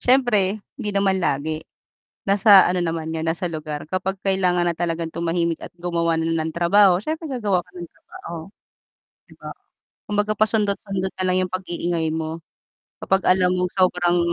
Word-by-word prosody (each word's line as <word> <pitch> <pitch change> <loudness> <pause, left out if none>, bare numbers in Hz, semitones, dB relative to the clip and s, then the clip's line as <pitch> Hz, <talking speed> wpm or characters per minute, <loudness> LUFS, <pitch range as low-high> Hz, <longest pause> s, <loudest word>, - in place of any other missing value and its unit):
siyempre 215 -6 +2 0.2
hindi 210 -4 -2
naman 195 -1 +2
lagi. 155 +1 -1 0.7
Nasa 200 -1 +7
ano 180 0 0
naman 165 -1 -3
'yan, 160 0 -2
nasa 175 +2 -1
lugar, 155 -2 -5
kapag 190 +1 -2
kailangan 180 -2 +2
na 170 - 0
talagang 165 -1 -2
tumahimik 170 0 -1
at - - -9
gumawa 170 -1 0
na 160 - -1 0.2
ng 160 - -4
trabaho, 180 +1 +4
siyempre 315 - -4
gagawa 205 -8 0
ka 180 - -24
ng 175 -1 -7
trabaho 170 - -11 1.0
'di - - -15
ba? - - -8 0.6
Kumbaga 210 +1 0
pasundot-sundot 200 -3 0
na 185 - -1
lang 185 - +2
'yung 180 - -16
pag-iingay 175 -3 -2
mo, 160 +1 -4 0.6
kapag 190 0 +1
alam 185 -1 +4
mong 180 0 -1
sobrang 180 -1 +2
180 Hz, 160 wpm, -22 LUFS, 170-195 Hz, 1.0 s, Nasa